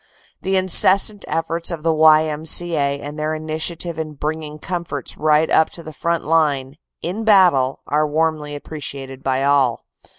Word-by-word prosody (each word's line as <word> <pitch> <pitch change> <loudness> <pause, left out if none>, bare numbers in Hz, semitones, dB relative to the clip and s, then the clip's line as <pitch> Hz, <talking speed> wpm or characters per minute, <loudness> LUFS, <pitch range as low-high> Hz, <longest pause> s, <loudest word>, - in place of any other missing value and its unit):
The 190 +1 -1
incessant 190 +2 +4
efforts 165 +1 -2
of 165 -3 -6
the 165 -1 +2
Y.M.C.A. 155 -1 +3
and 145 +2 -8
their 155 +1 -2
initiative 160 +2 -4
in 155 -1 -5
bringing 150 +1 -5
comforts 170 -4 -5
right 155 +1 +2
up 160 - +3
to 170 - -10
the 155 - -10
front 170 +2 -2
line, 150 -4 0 0.3
in 190 +6 -4
battle, 180 -11 +3
are 150 +1 0
warmly 155 -1 -1
appreciated 140 -3 -8
by 135 0 -1
all. 140 -4 +1
155 Hz, 145 wpm, -19 LUFS, 145-165 Hz, 0.3 s, incessant